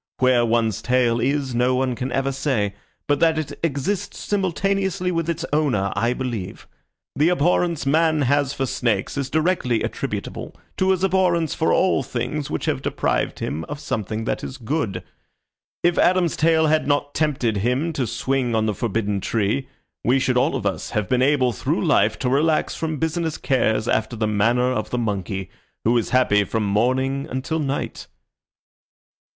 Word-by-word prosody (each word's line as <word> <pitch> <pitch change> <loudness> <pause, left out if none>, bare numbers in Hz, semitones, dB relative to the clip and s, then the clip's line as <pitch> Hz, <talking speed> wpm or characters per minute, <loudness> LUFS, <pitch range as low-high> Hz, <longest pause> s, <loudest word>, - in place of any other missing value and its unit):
Where 130 -2 +4
one's 115 -3 +1
tail 120 -2 +2
is 135 0 0
no 125 +2 +2
one 130 0 0
can 125 +1 -4
ever 135 +2 0
say, 130 -7 -1 0.3
but 145 -1 +2
that 165 -1 +3
it 155 -2 -4
exists 165 +5 -2
simultaneously 190 -1 0
with 165 -1 -1
its 170 0 -2
owner 130 -11 +1
I 120 +1 +1
believe. 120 -8 -5 0.5
The 155 +4 +3
abhorrence 175 -2 +1
man 155 +1 +3
has 140 +1 +2
for 135 - -2
snakes 115 -6 -1
is 140 -2 -2
directly 155 -8 +1
attributable - - -4 0.2
to 190 - +2
his 190 -1 +2
abhorrence 180 -4 +2
for 160 - +1
all 185 -6 +3
things 135 +3 -3
which - - -3
have - - -1
deprived - - -1
him 80 +2 -3
of 150 0 -6
something 110 -5 -3
that - - -2
is 130 - -6
good. 115 - -2 0.8
If 175 0 +3
Adam's 180 -2 +3
tail 160 0 +3
had 155 -1 +2
not 145 0 0
tempted 130 -8 0
him 125 - 0
to 130 -5 -1
swing 125 +1 -1
on 110 -1 +2
the 105 - 0
forbidden 105 -1 -1
tree, 110 +6 0 0.4
we 125 +3 +3
should 130 -1 +1
all 125 +2 +2
of 120 -6 -3
us 100 - -2
have 105 -2 -1
been 125 -1 +1
able 130 -2 +3
through - - -1
life - - +3
to - - -2
relax 155 +4 +2
from 160 -1 -3
business 160 +1 -1
cares 115 -4 +1
after 110 +2 0
the 110 -1 -1
manner 115 +4 +2
of 110 -4 -2
the 125 - -2
monkey, 100 -4 -3 0.3
who 115 +2 +3
is 115 - +1
happy 115 -5 +3
from 110 +2 -2
morning 130 +7 +1
until 135 +5 -2
night." 140 -2 -3
130 Hz, 170 wpm, -22 LUFS, 115-155 Hz, 0.8 s, Where